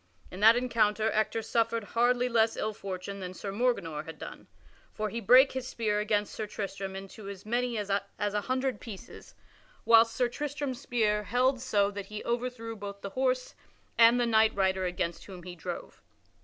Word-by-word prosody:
In 185 - -8
that 220 +2 +7
encounter 220 -3 +1
Ector 215 +1 0
suffered 230 0 0
hardly 245 +3 +2
less 225 -2 +2
ill 215 0 -2
fortune 195 0 -6
than 185 -1 -6
Sir 195 +2 -5
Morganor 195 -9 -1
had 160 - -9
done. - - -9 0.5
For 215 0 -2
he 230 +2 -4
brake 255 +6 +7
his 260 -1 -4
spear 215 -4 -1
against 210 -1 0
Sir 215 - -4
Tristram 195 -2 -5
into 195 +1 -8
as 200 -1 -9
many 240 +1 -1
as 205 -1 -3
an 200 - +2 0.2
hundred 255 +6 -1
pieces, 210 -5 -10 0.5
whilst 230 0 +6
Sir 250 - +2
Tristram's 285 0 -4
spear 215 -5 +1
held 255 +2 +2
so 205 -5 +2
that 200 -1 -6
he 215 0 -7
overthrew 235 -1 -3
both 200 -1 -8
the 200 - -6
horse 255 +1 0 0.4
and 235 +1 +6
the 240 - +2
knight 220 -1 +4
rider 190 -1 +1
against 175 -1 -3
whom 185 -3 -10
he 180 0 -8
drove. 165 - -7
220 Hz, 180 wpm, -29 LUFS, 200-240 Hz, 0.5 s, that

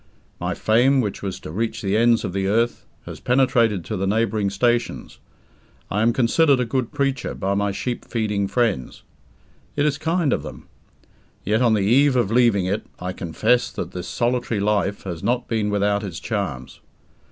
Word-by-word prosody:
My - - -2
fame 125 +5 +3
which 105 -6 -2
was 95 -2 -4
to - - -8
reach 110 +6 -3
the 100 +1 0
ends 115 +1 +3
of 90 - -4
the 95 0 -1
earth 115 +4 0 0.2
has - - -8
penetrated 120 -7 +2
to - - -4
the 95 +1 -1
neighbouring 110 -1 +1
stations. 120 +4 -1 0.7
I 105 - 0
am 115 +1 +4
considered 135 +4 +3
a 125 - +1
"good 120 +1 -2
preacher" 140 -3 -1
by 100 +1 -1
my 100 0 0
sheep 120 +5 -4
feeding 105 -4 -1
friends. 105 - -1 0.7
It 145 - +1
is 140 -2 0
kind 160 -1 +1
of - - -1
them. - - -10 0.8
Yet, 110 +4 +1
on 115 -3 +4
the 105 - +1
eve 135 +6 +4
of 120 -5 +1
leaving 115 -6 +3
it, 100 +4 -1
I 90 +1 -4
confess 110 +9 +1
that - - -5
this 90 -1 -6
solitary 120 -2 -1
life 100 -1 0
has 85 -4 -5
not 120 +4 0
been 110 -2 0
without 100 0 +1
its 90 -5 -5
charms. 100 - -4
110 Hz, 180 wpm, -22 LUFS, 100-125 Hz, 0.8 s, am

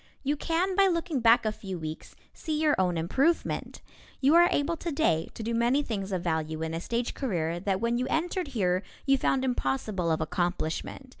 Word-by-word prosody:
You 290 +2 +1
can 345 +5 0
by 395 0 +5
looking 335 -5 0
back 230 0 +5
a 215 - +2
few 195 -3 -6
weeks 155 -1 -7 0.2
see 310 -2 -3
your 305 -1 +3
own 180 -2 +1
improvement. 270 - 0 0.4
You 280 +3 +4
are 345 +1 +7
able 290 +4 +1
today 285 - 0
to 225 - -6
do 230 +2 -2
many 240 +5 +2
things 200 -6 -4
of 180 -2 -2
value 160 -2 -2
in 160 0 -3
a 165 - -3
stage 235 +5 -2
career 170 - -2
that 190 0 -1
when 235 +1 0
you 255 - -1
entered 350 +2 -1
here 180 -2 +2 0.2
you 275 -1 +3
found 265 -1 +1
impossible 180 - -1
of 160 - +1
accomplishment. 175 - -2
230 Hz, 195 wpm, -28 LUFS, 175-290 Hz, 0.4 s, are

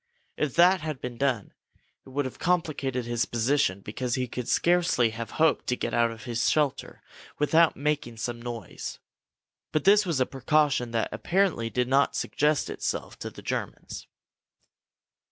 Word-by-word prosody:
If 150 -4 -2
that 180 +2 +5
had 155 -3 -4
been 120 -2 -6
done, 125 -7 0 0.5
it - - -11
would 140 +1 -1
have 130 - -7
complicated 145 -8 0
his 120 0 -1
position, 120 -4 +1
because 120 +4 -3
he 130 -1 -1
could 125 0 -5
scarcely 170 -10 +3
have 115 0 -6
hoped 160 -1 +2
to 125 - +1
get - - -3
out 120 0 +3
of 115 -1 -9
his 120 -2 0
shelter 150 -3 -1 0.3
without 160 +2 +4
making 145 -5 -1
some 120 0 -4
noise. 120 -5 -6 0.7
But 155 - 0
this 205 +2 +6
was 170 -7 -1
a 130 - +3
precaution 135 -2 +1
that 115 -1 -1
apparently 175 -11 0
did 125 +1 0
not 135 +2 +3
suggest 150 -1 +1
itself - - -4
to - - -5
the - - -13
Germans. - - -5
130 Hz, 160 wpm, -27 LUFS, 120-155 Hz, 0.7 s, this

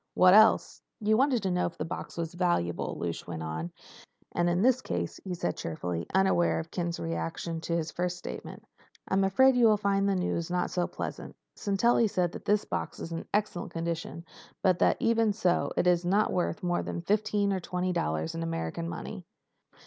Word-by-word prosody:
"What 185 0 +7
else?" 220 +2 +5 0.2
"You 215 0 +2
wanted 255 -2 +2
to 190 - 0
know 180 0 +1
if 170 - -9
the 155 - -3
box 175 +1 -6
is 165 0 -3
valuable," 175 - 0
Lausch 85 -1 -4
went 80 -2 -5
on. 80 +2 -4 0.6
"And 175 0 +1
in 175 +3 +1
this 255 +1 +4
case," 85 - -3
he 185 -2 -4
said, 90 - -2
cheerfully 85 +1 -4
unaware 190 -2 +3
of 160 0 -5
Ken's 170 -2 -2
reaction 85 - -3
to 170 0 -1
his 160 -1 -3
first 180 0 -2
statement, - - -8 0.4
"I'm 195 +1 +2
afraid 260 +8 +5
you 240 -2 +6
will 215 -1 +5
find 200 -1 +1
the 195 - +2
news 180 -2 -1
not 180 0 -1
so 180 -1 0
pleasant. - - -6 0.2
Sintelli 220 +3 +2
says 180 -3 0
this 210 +3 0
box - - -4
is 165 - -6
in 165 - -5
excellent 210 -3 -1
condition, 165 0 -4 0.4
but 185 -2 +3
that - - +3
even 230 -2 +2
so 180 -2 +1
it - - +2
is 175 -1 +3
not 200 +4 +2
worth 180 +3 -1
more 175 0 +1
than 170 - -5
fifteen 205 0 +1
or 190 - -1
twenty 180 +1 -2
dollars 80 - -1
in 80 - -4
American 80 0 -3
money." 85 - -6
180 Hz, 195 wpm, -29 LUFS, 165-200 Hz, 0.6 s, What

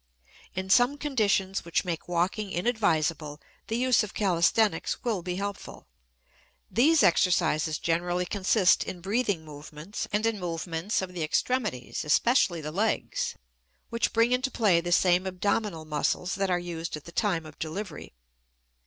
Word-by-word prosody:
In 190 +1 -3
some 245 +6 +4
conditions 210 -9 0
which 170 +2 -1
make 170 -3 -4
walking 185 +4 -1
inadvisable 165 -8 0 0.3
the 225 - -1
use 255 0 +3
of 210 -3 -6
calisthenics 190 0 +1
will 220 -6 -1
be 180 +1 -4
helpful. 200 +1 -6 0.9
These 300 +6 +4
exercises 165 -3 +2
generally 175 +2 -1
consist 195 0 +3
in 180 - -6
breathing 200 -4 -1
movements 150 +5 -7
and 210 +2 0
in 225 -2 0
movements 170 +2 -2
of 180 -1 -7
the 175 - -5
extremities, 195 - -1
especially 175 - +2
the 150 0 -5
legs, 475 - -1 0.5
which 230 -1 0
bring 230 +2 +3
into 255 +2 +1
play 205 -9 +3
the 175 +1 -4
same 180 +1 +3
abdominal 190 -2 -1
muscles 155 +4 -1
that 195 -1 -1
are 180 - +2
used 170 -2 -5
at 150 - -12
the 170 - -10
time 175 -4 0
of 155 -1 -13
delivery. 160 - -6
185 Hz, 145 wpm, -27 LUFS, 165-215 Hz, 0.9 s, some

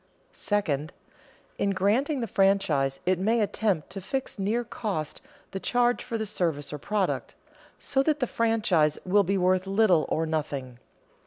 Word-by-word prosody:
Second, 160 -7 -1 0.7
in 200 - +1
granting 245 +10 +1
the - - 0
franchise 180 -10 +2
it 185 0 +2
may 225 +5 +2
attempt 200 -6 0
to 195 +1 -6
fix 265 +2 -4
near 215 +5 0
cost 200 -9 -4 0.3
the 190 - -4
charge 245 +3 +1
for 235 -2 -3
the 220 - -2
service 160 -8 -2
or 150 - -5
product, 200 +3 -2 0.4
so 270 -1 0
that 300 +2 +1
the 255 - +1
franchise 210 -11 +2
will 200 +3 +4
be 195 +2 0
worth 185 +1 +2
little 195 -5 +3
or 160 - 0
nothing. 140 -6 -3
195 Hz, 155 wpm, -27 LUFS, 160-225 Hz, 0.7 s, will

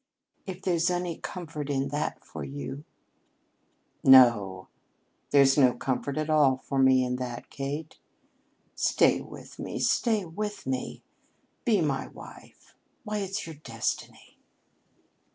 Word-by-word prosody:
If 190 0 -7
there's 175 -2 +2
any 175 -2 -2
comfort 155 -5 -6
in 135 -1 0
that 145 +2 -3
for - - -7
you 140 +1 -6 0.6
" - - -45 0.5
"No, 115 -8 +6 0.6
there's 140 0 +5
no 130 -3 +6
comfort 135 +3 -2
at 155 0 -1
all 150 -4 +4
for 135 +1 -3
me 130 -1 +5
in 125 0 -2
that, 125 -1 -6
Kate. 145 +3 -5 0.7
Stay - - +3
with - - -12
me, - - -5
stay 220 -5 +1
with 205 +4 -5
me! 130 -1 -4 0.6
Be 215 -7 +3
my 145 -4 -1
wife. - - -14 0.3
Why, 210 -2 -3
it's 195 +1 -3
your 160 -2 -9
destiny." 115 -6 -5
145 Hz, 130 wpm, -28 LUFS, 130-175 Hz, 0.7 s, No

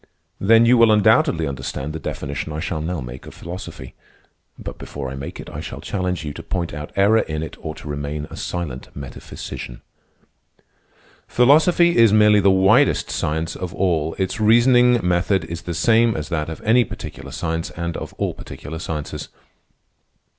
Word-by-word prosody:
"Then 115 +3 +5
you 120 +1 +5
will 115 -1 +6
undoubtedly 105 -6 +4
understand 70 +2 -4
the 80 - -5
definition 75 +1 -5
I 75 - -4
shall 80 -1 -3
now 85 -1 -3
make 60 +1 -9
of - - -11
philosophy. 85 - -8 0.6
But - - -8
before 70 -2 -6
I - - -6
make 70 +1 -7
it, - - -8
I - - -7
shall - - -7
challenge 90 -4 -3
you 75 - -4
to - - -8
point 85 -2 -3
out 75 0 -7
error 100 +3 +4
in 80 -4 -3
it 80 - -7
or 80 -1 -5
to - - -11
remain 75 +1 -4
a - - -7
silent 80 -8 -5
metaphysician. 60 -2 -8 1.4
Philosophy 160 +7 +4
is 115 -3 +6
merely 105 -1 +6
the 100 0 +4
widest 95 0 +4
science 80 +2 -2
of 90 -2 -6
all. 80 -4 0
Its 95 +4 -2
reasoning 120 +2 +5
method 90 0 +1
is 85 +1 -6
the 85 - -5
same 115 +5 +3
as 75 -1 -5
that 80 -3 -2
of 80 - -8
any 120 +3 +4
particular - - -8
science 80 0 -3
and 85 -1 -4
of - - -6
all - - -2
particular 80 +2 -8
sciences. 75 -3 -5
85 Hz, 175 wpm, -21 LUFS, 75-105 Hz, 1.4 s, will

